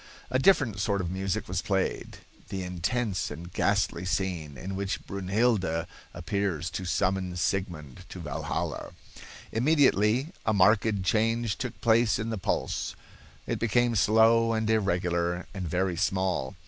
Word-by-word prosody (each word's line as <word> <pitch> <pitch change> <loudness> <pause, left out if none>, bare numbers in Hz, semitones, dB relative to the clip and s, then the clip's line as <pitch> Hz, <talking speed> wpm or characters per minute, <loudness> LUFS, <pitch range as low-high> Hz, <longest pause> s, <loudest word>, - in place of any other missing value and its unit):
A 130 - +2
different 135 - +3
sort 100 0 0
of 90 -2 -2
music 95 +2 -2
was 95 0 -1
played 95 -2 -2 0.3
(the 95 -1 -3
intense 95 +4 -1
and 85 +4 -9
ghastly 100 -3 +1
scene 85 -5 -2
in 95 +1 -5
which 100 0 -3
Brunhilde 95 -3 0 0.3
appears 90 -2 -2
to 95 - -4
summon 90 0 0
Sigmund 85 - -3
to - - -8
Valhalla). - - -4 0.6
Immediately 130 -1 +3
a 110 - +1
marked 100 +1 +3
change 115 +2 +1
took - - -5
place 115 -3 +4
in 110 +2 -3
the 110 - -3
pulse. - - -2 0.5
It - - -2
became 120 +1 +2
slow 110 +3 +4
and 110 -1 0
irregular, 90 -4 0
and 95 -3 -4
very 90 +1 0
small. 95 -7 0
95 Hz, 135 wpm, -28 LUFS, 90-110 Hz, 0.6 s, place